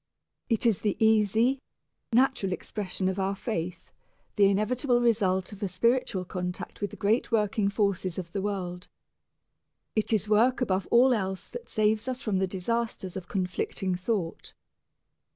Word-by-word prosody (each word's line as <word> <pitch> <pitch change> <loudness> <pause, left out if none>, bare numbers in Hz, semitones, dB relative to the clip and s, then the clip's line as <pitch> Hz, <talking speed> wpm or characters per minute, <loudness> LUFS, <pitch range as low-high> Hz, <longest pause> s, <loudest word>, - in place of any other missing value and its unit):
It 225 0 +1
is 225 -5 +3
the 210 -2 0
easy, 220 +4 +3 0.5
natural 235 -6 +2
expression 190 -1 -3
of 190 +1 -1
our 195 +1 0
faith, 180 -5 -4 0.4
the 205 - +5
inevitable 240 +5 +1
result 200 -6 +1
of 200 - -11
a 200 - 0
spiritual 195 0 +1
contact 180 +1 -5
with 205 - -1
the - - -10
great 220 +5 +1
working 210 -2 +2
forces 200 -4 0
of 175 -3 -5
the 195 - -2
world. 185 -3 -4 1.1
It 215 +1 +1
is 215 -2 +2
work 230 +5 +4
above 195 -6 0
all 250 +2 +6
else 190 -4 -2
that 485 0 -8
saves 215 +2 +1
us 255 -1 -2
from 215 -8 -1
the 190 - +1
disasters 195 0 -2
of 185 -2 -6
conflicting 185 0 -2
thought. 180 -2 -3
205 Hz, 150 wpm, -28 LUFS, 185-230 Hz, 1.1 s, all